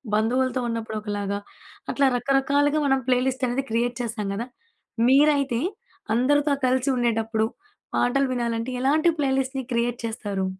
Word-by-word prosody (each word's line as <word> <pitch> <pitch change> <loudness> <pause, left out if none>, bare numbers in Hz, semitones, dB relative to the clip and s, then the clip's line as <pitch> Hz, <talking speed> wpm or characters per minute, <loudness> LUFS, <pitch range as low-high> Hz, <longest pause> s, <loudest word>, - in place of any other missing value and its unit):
బంధువులతో 255 +4 +1
ఉన్నప్పుడు 225 -1 -3
ఒకలాగా 205 -1 -3 0.5
అట్లా, 280 -1 +3
రకరకాలుగా 280 +3 +2
మనం 270 -1 +2
ప్లేలిస్ట్ 255 +1 +1
అనేది 265 +3 -1
క్రియేట్ 235 +1 0
చేస్తాం 220 -3 -3
కదా! 230 +4 -4 0.6
మీరైతే 275 -3 +4 0.6
అందరితో 290 +4 +3
కలిసి 255 +1 +1
ఉండేటప్పుడు, 225 -2 0 0.5
పాటలు 275 +2 +2
వినాలంటే 235 0 -2
ఎలాంటి 305 +5 +3
ప్లేలిస్ట్‌ని 265 -1 0
క్రియేట్ 235 0 0
చేస్తారు? 205 -4 -3
250 Hz, 120 wpm, -24 LUFS, 230-270 Hz, 0.6 s, మీరైతే